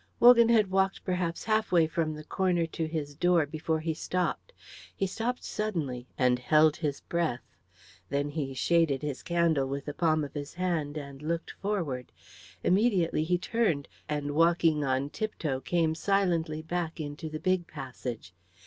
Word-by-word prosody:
Wogan 235 -1 +8
had 215 -5 +4
walked 190 0 +1
perhaps 180 -3 -1
halfway 215 -7 +3
from 155 -1 -1
the 155 - -8
corner 175 +1 +1
to 160 0 -3
his 155 -3 -4
door 175 +1 +3
before 160 +2 -2
he 160 0 -1
stopped. 180 - -2 0.4
He 195 - 0
stopped 230 +6 -3
suddenly 150 -13 -3
and 125 -1 +3
held 155 +4 +4
his 150 -4 -2
breath. 170 -8 -1 0.7
Then 145 +1 0
he 140 -3 -3
shaded 155 -2 +2
his 145 -3 -3
candle 170 -5 +1
with 140 +1 -4
the 145 - -4
palm 155 -1 +2
of 145 - -6
his 145 -1 -6
hand 165 -5 -1
and 140 -2 -8
looked 165 +2 -2
forward. 170 -12 -3 0.5
Immediately 185 -6 +2
he 180 +2 +2
turned, 180 -7 0 0.2
and 145 -1 -2
walking 165 -1 +3
on 135 +1 0
tiptoe 160 -11 -2
came 165 +2 +1
silently 165 -4 0
back 170 0 -3
into 150 +1 -5
the 155 0 -5
big 185 -1 +1
passage. 125 - -7
160 Hz, 160 wpm, -29 LUFS, 145-180 Hz, 0.7 s, Wogan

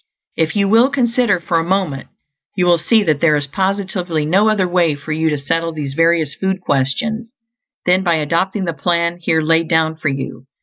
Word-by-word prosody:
If 160 +3 -1
you 200 -1 +2
will 230 +6 +4
consider 245 -6 +1
for 170 -1 0
a - - -1
moment, 175 -6 -2 0.5
you 180 -2 +1
will 175 -1 +4
see 220 +6 +2
that 155 -6 0
there 155 -3 +4
is 145 -1 -1
positively 185 -1 -2
no 195 +7 +3
other 200 -4 +1
way 175 -4 +1
for 145 +2 -8
you 160 +1 0
to 150 - -1
settle 165 +4 -2
these 145 -3 -5
various 165 -2 +2
food 190 0 -2
questions 190 - -2 0.5
than 180 +1 +3
by 175 -3 +1
adopting 180 +6 -1
the 170 - -2
plan 170 +2 0
here 160 -2 0
laid 165 +1 +2
down 160 -1 +1
for 155 -1 -2
you. 135 -2 -6
170 Hz, 200 wpm, -17 LUFS, 155-190 Hz, 0.5 s, will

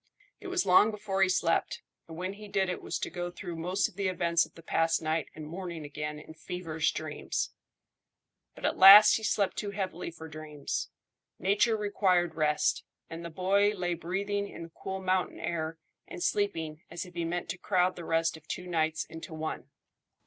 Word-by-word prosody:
It - - -9
was 370 -1 0
long 185 +4 +6
before 205 -2 -2
he 190 - +5
slept, 175 -2 +1 0.2
and 160 -1 -9
when 185 +2 -3
he 210 +1 -10
did 195 -2 0
it 180 - -3
was - - -3
to - - -4
go 175 0 -3
through 175 -1 -7
most 180 +4 0
of - - -15
the 200 -1 0
events 170 -2 +2
of - - -29
the 165 - -13
past 165 0 +2
night 160 0 -1
and 155 - -7
morning 170 -1 -6
again 150 +1 -5
in 150 +1 -11
feverish 165 -1 -2
dreams. 155 -1 -3 1.0
But - - -6
at - - 0
last 205 +2 +11
he 220 - -8
slept 205 -2 +1
too 205 - -2
heavily 190 -4 -4
for 160 -1 -10
dreams. 155 -2 -5 0.5
Nature 210 +4 +2
required 185 -5 +2
rest, 150 -2 +1 0.3
and 165 +1 -6
the 170 - -5
boy 200 +5 +2
lay 175 -2 -1
breathing 200 +4 -2
in - - -8
the 165 - -10
cool 190 +3 -5
mountain 185 0 0
air 160 -1 -3 0.3
and 175 - -6
sleeping 165 -7 -1
as 175 - -5
if 180 - -13
he 170 0 -2
meant 175 +1 -2
to 180 +2 -4
crowd 185 -2 +2
the 175 - -8
rest 165 0 +1
of 160 -1 -15
two 180 - -4
nights 160 -2 0
into 160 0 -9
one. 155 0 -5
175 Hz, 195 wpm, -30 LUFS, 160-195 Hz, 1.0 s, last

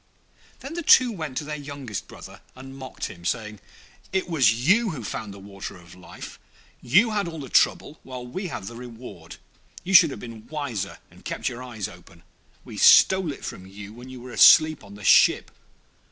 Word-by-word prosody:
Then 275 +4 -8
the 345 - -4
two 255 -5 +6
went 155 - -6
to - - -2
their 150 0 -5
youngest 140 -7 -7
brother, - - -13
and 135 +1 -11
mocked 130 -1 -7
him, 85 - -10
saying, 105 +2 -3 0.5
'It 190 -1 -1
was 140 -10 +3 0.2
you 225 +4 +4
who 145 -9 -6
found 105 0 -6
the 100 - -11
Water 100 -1 -9
of 85 -1 -16
Life; 90 -2 -11 0.4
you 190 - +3
had 205 -3 -1
all 165 -1 -7
the 135 -3 -8
trouble, 150 - +1
while 125 -1 -9
we 185 +10 -5
have 110 - -7
the 115 - -8
reward. 120 0 -11 0.5
You 190 - -4
should 175 -3 +8
have - - -8
been 115 -1 -11
wiser, 125 -10 -5
and - - -19
kept - - -3
your 120 - -8
eyes 115 -6 -6
open; 85 -1 -16 0.4
we - - -10
stole 190 -4 +6
it - - -9
from 95 - -8
you 100 +2 -11
while 120 +2 -12
you 130 -1 -10
were 125 +1 -10
asleep 155 +4 +6
on 100 0 -13
the 105 - -12
ship. - - +4
130 Hz, 195 wpm, -24 LUFS, 105-160 Hz, 0.5 s, should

